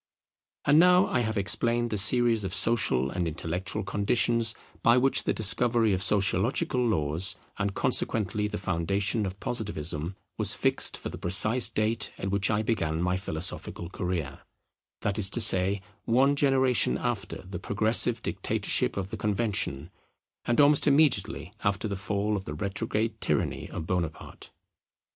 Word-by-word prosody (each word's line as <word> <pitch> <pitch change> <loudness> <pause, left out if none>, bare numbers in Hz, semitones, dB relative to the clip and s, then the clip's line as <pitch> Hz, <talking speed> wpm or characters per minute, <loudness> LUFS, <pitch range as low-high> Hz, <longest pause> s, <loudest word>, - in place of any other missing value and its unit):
And 145 +2 +5
now 180 +2 +5
I 125 - -1
have 110 -2 -2
explained 115 +4 0
the 105 - -1
series 115 +1 +4
of 95 0 -3
social 70 - +1
and 90 -2 -2
intellectual 85 +5 -3
conditions 115 +3 +1 0.3
by 115 +1 +4
which 135 +2 +1
the - - +1
discovery 110 +1 +2
of 95 - -1
sociological 110 - +1
laws, 85 -5 +1 0.2
and 100 0 -2
consequently 105 -1 0
the 105 0 -5
foundation 100 +4 -1
of 95 +1 -8
Positivism, 85 -7 -4 0.2
was - - +3
fixed - - 0
for - - -7
the - - -9
precise 105 +7 +4
date 110 0 -1
at 95 - -4
which 100 0 +1
I 105 0 0
began 80 -9 -2
my 90 +1 0
philosophical 85 -1 -4
career: 90 -8 -4 0.6
that 100 +1 -2
is 95 -2 +3
to 120 - -2
say, 95 -2 +5 0.2
one 135 +5 +2
generation 135 -3 +2
after 115 -5 -4
the 95 -1 -7
progressive 110 +4 +2
dictatorship - - -1
of 95 -1 -4
the 110 - -5
Convention, 100 -8 -2 0.5
and 120 - 0
almost 145 0 +4
immediately 105 - +1
after 100 +2 -1
the 100 - -4
fall 105 +2 -2
of 95 -1 -5
the 75 - -6
retrograde 100 +5 -3
tyranny - - -2
of 80 - -6
Bonaparte. 85 -2 -5
105 Hz, 150 wpm, -27 LUFS, 95-115 Hz, 0.6 s, And